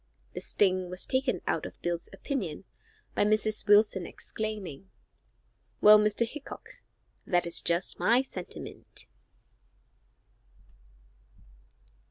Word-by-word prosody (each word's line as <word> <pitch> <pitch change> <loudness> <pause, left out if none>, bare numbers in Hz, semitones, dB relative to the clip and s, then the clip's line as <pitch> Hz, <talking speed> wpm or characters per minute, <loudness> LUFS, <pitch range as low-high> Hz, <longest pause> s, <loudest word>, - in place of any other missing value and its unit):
The - - -6
sting 185 -2 +1
was 180 +1 -3
taken 260 0 0
out - - -1
of - - -14
Bill's 175 -1 -2
opinion 200 - -4 0.5
by - - +2
Mrs. 215 0 +1
Wilson 205 -3 +4
exclaiming, 195 -6 -6 0.9
"Well, 210 0 +8
Mr. 210 +2 +1
Hickok, 285 +4 -10 0.5
that 175 -2 +2
is 170 - +5
just 170 +2 0
my 245 +3 +4
sentiment." 185 -9 -5
205 Hz, 100 wpm, -29 LUFS, 180-220 Hz, 0.9 s, Well